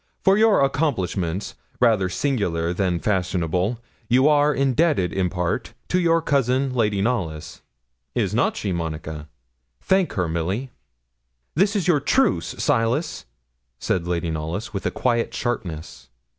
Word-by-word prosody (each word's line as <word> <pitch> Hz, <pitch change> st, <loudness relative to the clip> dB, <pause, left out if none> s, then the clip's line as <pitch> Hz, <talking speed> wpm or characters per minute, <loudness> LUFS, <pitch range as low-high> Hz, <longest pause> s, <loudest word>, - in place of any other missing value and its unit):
For 195 Hz, -, +5 dB
your 215 Hz, -3 st, +4 dB
accomplishments 100 Hz, -, -1 dB, 0.3 s
rather 110 Hz, -7 st, +3 dB
singular 90 Hz, -, -1 dB
than 90 Hz, -2 st, 0 dB
fashionable 90 Hz, +2 st, 0 dB, 0.3 s
you 130 Hz, +4 st, +5 dB
are 150 Hz, 0 st, +4 dB
indebted, 135 Hz, -, +1 dB
in 95 Hz, -2 st, 0 dB
part, 90 Hz, -1 st, -2 dB
to 180 Hz, -, +2 dB
your 165 Hz, -2 st, +2 dB
cousin, 135 Hz, -2 st, +1 dB
Lady 105 Hz, -5 st, +1 dB
Knollys. 90 Hz, -10 st, -3 dB, 0.5 s
Is -, -, 0 dB
not -, -, +1 dB
she, 100 Hz, -, -2 dB
Monica? 80 Hz, -2 st, -5 dB, 0.5 s
Thank 190 Hz, -2 st, +1 dB
her, 90 Hz, -3 st, 0 dB
Milly.' 90 Hz, +11 st, -2 dB, 0.8 s
'This 195 Hz, +6 st, +2 dB
is 190 Hz, -4 st, 0 dB
your 165 Hz, -5 st, +4 dB
truce, 140 Hz, -, +1 dB
Silas,' 115 Hz, +8 st, 0 dB, 0.5 s
said 85 Hz, +5 st, -1 dB
Lady 85 Hz, -1 st, -1 dB
Knollys, 80 Hz, +8 st, -4 dB
with 100 Hz, -, -2 dB
a -, -, +2 dB
quiet 120 Hz, -2 st, 0 dB
sharpness. 85 Hz, -, -4 dB
105 Hz, 130 wpm, -23 LUFS, 85-140 Hz, 0.8 s, For